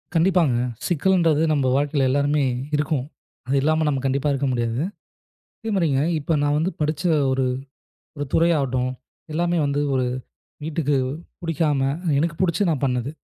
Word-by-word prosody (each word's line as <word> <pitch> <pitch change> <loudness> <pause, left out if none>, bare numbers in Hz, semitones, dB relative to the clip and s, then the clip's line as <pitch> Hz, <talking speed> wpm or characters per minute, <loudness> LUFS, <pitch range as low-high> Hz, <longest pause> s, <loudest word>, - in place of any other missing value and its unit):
கண்டிப்பாங்க. 165 -6 +3 0.3
சிக்கல்ன்றது 165 -2 +2
நம்ம 140 -3 +1
வாழ்க்கையில 140 -1 +1
எல்லாருமே 145 +2 +2 0.3
இருக்கும். 145 -3 0 0.4
அது 135 - +1
இல்லாம 155 +2 +2
நாம 135 -3 0
கண்டிப்பா 140 +2 +1
இருக்க 140 0 0
முடியாது. 120 +1 -1 0.8
அதேமாரிங்க 180 - +1 0.2
இப்ப 150 +2 -2
நான் 145 0 +2
வந்து 165 +4 0
படிச்ச 150 0 -1 0.3
ஒரு 130 0 +1 0.7
ஒரு 145 - -2
துறை 165 +1 +4
ஆகட்டும். 130 -2 0 0.4
எல்லாமே 175 +2 +1
வந்து 140 +1 0
ஒரு 130 -1 +1 0.6
வீட்டுக்கு 150 -2 0 0.5
புடிக்காம 155 -4 0 0.4
எனக்குப் 165 +2 -1
புடிச்ச 175 +2 +1
நான் 145 -4 -1
பண்ணது. 125 +1 -1
145 Hz, 135 wpm, -23 LUFS, 135-165 Hz, 0.8 s, துறை